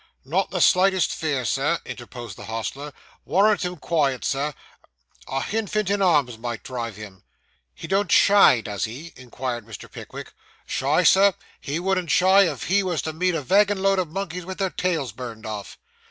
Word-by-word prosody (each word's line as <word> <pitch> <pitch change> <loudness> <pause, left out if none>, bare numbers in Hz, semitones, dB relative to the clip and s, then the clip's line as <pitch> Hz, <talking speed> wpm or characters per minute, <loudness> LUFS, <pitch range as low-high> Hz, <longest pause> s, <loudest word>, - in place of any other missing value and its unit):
'Not - - 0
the - - -2
slightest 190 0 +4
fear, 145 -6 -2
Sir,' 145 +8 +1
interposed 120 -3 -8
the - - -10
hostler. 125 +6 -5 0.3
'Warrant 205 +1 +3
him 180 0 -3
quiet, 145 -5 0
Sir; 140 +1 -1 0.7
a 135 0 -2
hinfant 215 -2 -1
in 200 0 0
arms 145 -11 +2
might 120 -1 -5
drive 120 -4 -5
him.' 100 -3 -11 0.5
'He - - -9
don't 195 0 0
shy, 200 - +6
does 105 -3 -3
he?' 135 +10 -9
inquired 125 -1 -5
Mr. 105 -3 -11
Pickwick. - - -9 0.3
'Shy, 145 +6 +1
sir? 195 +2 +5 0.2
he 145 +4 -3
wouldn't 185 -2 -1
shy 190 +2 +5
if 135 -6 -7
he 200 +3 +2
was 180 -4 -2
to 160 - -4
meet 180 +2 0
a 155 - -2
vagin 200 +4 +3
load 195 -1 +3
of 180 - -1
monkeys 180 0 -4
with 185 +2 -7
their 190 -2 -1
tails 165 -9 -1
burned 115 -1 -8
off. 105 -2 -6
160 Hz, 175 wpm, -23 LUFS, 125-190 Hz, 0.7 s, shy